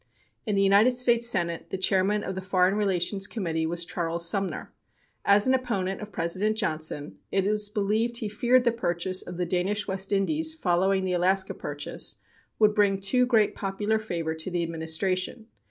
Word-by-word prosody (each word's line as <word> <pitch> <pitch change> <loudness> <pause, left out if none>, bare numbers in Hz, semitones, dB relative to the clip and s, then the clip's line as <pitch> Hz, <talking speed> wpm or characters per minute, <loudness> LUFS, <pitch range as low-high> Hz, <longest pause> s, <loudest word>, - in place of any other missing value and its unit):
In 210 - 0
the 195 - +3
United 200 +6 +5
States 240 -1 +3
Senate 170 -7 -1
the - - -3
chairman 195 +2 +1
of 190 - -4
the 190 - -5
Foreign 185 0 +2
Relations 195 -1 0
Committee 165 -7 -2
was 170 +1 -1
Charles 170 -1 -2
Sumner. 195 +1 -2 0.5
As 200 +1 +5
an 260 - +3
opponent 205 -8 -1
of 210 0 -8
President 185 +5 0
Johnson, 155 - -3
it 195 -1 +1
is 210 0 +2
believed 215 +3 0
he 220 - -3
feared 245 +4 +2
the 240 - +3
purchase 185 -4 -1
of 180 - -8
the 180 - -1
Danish 190 +4 -1
West 190 0 -2
Indies, 310 +11 +1
following 190 - +1
the 185 - -1
Alaska 190 +2 +1
purchase, 145 0 -4 0.4
would 210 -1 +4
bring 200 -2 +2
too 250 +6 +2
great 220 -4 +3
popular 205 +2 -1
favor 170 -7 -3
to 160 +3 -5
the 175 -1 -1
Administration. 170 +6 -2
195 Hz, 175 wpm, -26 LUFS, 175-210 Hz, 0.5 s, United